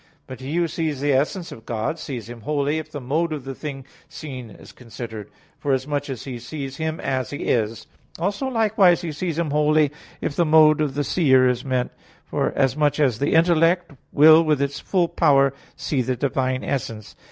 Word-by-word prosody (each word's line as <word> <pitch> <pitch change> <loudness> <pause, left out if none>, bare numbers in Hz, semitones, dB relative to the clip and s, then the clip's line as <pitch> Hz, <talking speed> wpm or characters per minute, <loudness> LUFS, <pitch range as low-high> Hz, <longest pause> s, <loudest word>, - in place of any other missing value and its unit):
But 130 -2 -9
he 135 +4 -5
who 170 -1 +2
sees 155 -3 -3
the 145 0 +1
essence 155 +7 -1
of 115 - -10
God, 120 +8 -2
sees 125 -8 -6
Him 120 -1 -10
wholly, 145 +4 0
if 160 - -9
the 145 - -5
mode 155 +6 -1
of 150 -4 -4
the 135 +1 -6
thing 135 -1 -7 0.2
seen 130 -6 -8
is 100 - -14
considered; 110 -3 -9 0.3
forasmuch 145 +1 -1
as 130 -4 -5
he 125 -3 -6
sees 135 +2 -6
Him 160 0 -3
as 130 -1 -2
He 145 - -5
is; 110 -1 -1 0.3
also, 200 +10 -2
likewise, 215 -7 +3
he 170 - -4
sees 160 +1 -3
Him 165 -3 -1
wholly 150 0 +3 0.3
if 145 - -3
the 175 - +3
mode 155 -1 +5
of 145 -3 -1
the 145 - 0
seer 130 -5 +4
is 125 -1 0
meant, 130 -2 -1 0.3
forasmuch 145 +2 0
as 130 -7 +2
the 140 - +1
intellect 165 +1 +3 0.2
will 155 +2 +7
with 155 -3 +1
its 140 0 -2
full 180 -3 +1
power 140 -5 +3 0.2
see 140 -4 -1
the 125 +1 -1
Divine 130 0 -1
essence. 115 -6 -4
145 Hz, 190 wpm, -22 LUFS, 130-160 Hz, 0.3 s, will